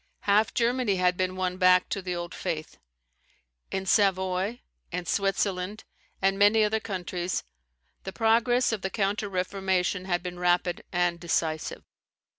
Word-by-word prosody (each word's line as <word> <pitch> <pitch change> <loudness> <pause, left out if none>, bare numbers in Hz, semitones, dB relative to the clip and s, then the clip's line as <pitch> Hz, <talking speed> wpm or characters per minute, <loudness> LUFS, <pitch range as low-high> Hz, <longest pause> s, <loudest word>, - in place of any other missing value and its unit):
Half 205 0 +2
Germany 240 -3 +1
had 180 -1 +2
been 185 0 -1
won 185 -1 -2
back 185 -1 +5
to 195 - -2
the 180 -1 -3
old 175 0 -5
faith. 160 -4 -5 0.9
In 190 0 -3
Savoy, 190 +2 +1 0.3
in 180 0 -3
Switzerland 195 +1 -1 0.4
and 195 0 +2
many 210 +2 +5
other 215 +1 +1
countries, 180 -3 -3 0.6
the 190 - -5
progress 235 +4 +2
of 220 -3 -2
the 190 - -2
counter 205 +1 -1
Reformation 185 0 -1
had 175 -2 -1
been 180 -1 -6
rapid 175 0 +1
and 175 -1 +1
decisive. 160 -2 -2
190 Hz, 140 wpm, -27 LUFS, 180-205 Hz, 0.9 s, back